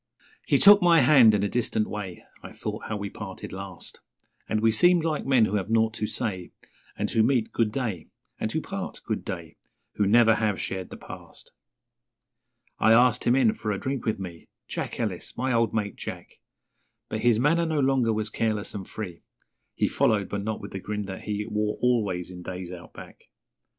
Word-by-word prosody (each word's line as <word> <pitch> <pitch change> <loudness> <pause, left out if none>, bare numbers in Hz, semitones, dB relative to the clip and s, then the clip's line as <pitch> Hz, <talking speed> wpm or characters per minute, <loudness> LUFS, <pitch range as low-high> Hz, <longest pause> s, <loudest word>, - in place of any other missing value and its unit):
He - - +4
took 205 0 +8
my 170 -3 +6
hand 125 -5 +7
in 100 - 0
a - - +2
distant 110 -1 -1
way 100 -4 -6 0.2
(I - - -10
thought - - -5
how 110 - -2
we 100 -1 -5
parted 95 -4 -8
last), 95 -3 -8 0.5
And 110 - +1
we 110 +1 +3
seemed 175 +8 +4
like 155 -4 -1
men 130 -5 +5
who 105 0 0
have 100 +1 -3
nought 110 -1 +2
to 110 -2 -2
say 95 -8 -4 0.5
And 105 - -1
who 115 - +3
meet 115 -1 +2
'Good 115 -2 +1
day', 110 -9 -3 0.3
and - - -2
who - - -1
part - - -6
'Good - - -2
day', - - -7 0.4
Who 105 - +2
never 115 +1 +6
have 105 -3 0
shared 95 -1 -4
the - - -9
past. - - -12 1.3
I 110 - +5
asked 120 +1 +4
him 120 - +4
in 125 -5 +4
for 110 0 -5
a 100 - -1
drink 135 +2 -3
with 110 - +1
me 90 -4 -8 0.2
Jack - - -4
Ellis - - -4
my 130 +1 0
old 115 -1 +2
mate, 105 -3 -2
Jack - - -8 0.7
But 110 - -3
his 115 -1 +3
manner 165 +6 +2
no 160 -2 0
longer 130 -4 +2
was 110 0 -2
careless 110 -2 -1
and 100 -2 -7
free, 90 -6 -7 0.5
He - - +1
followed, 100 -3 +1
but 100 - -3
not 110 0 -3
with - - -8
the 95 - -5
grin 105 +1 -4
that 95 -1 -7
he 105 0 -2
Wore 105 -1 -1
always 105 -8 0
in 90 -1 -9
days 90 0 -6
Out 90 -1 -10
Back. - - -12
110 Hz, 200 wpm, -26 LUFS, 100-120 Hz, 1.3 s, took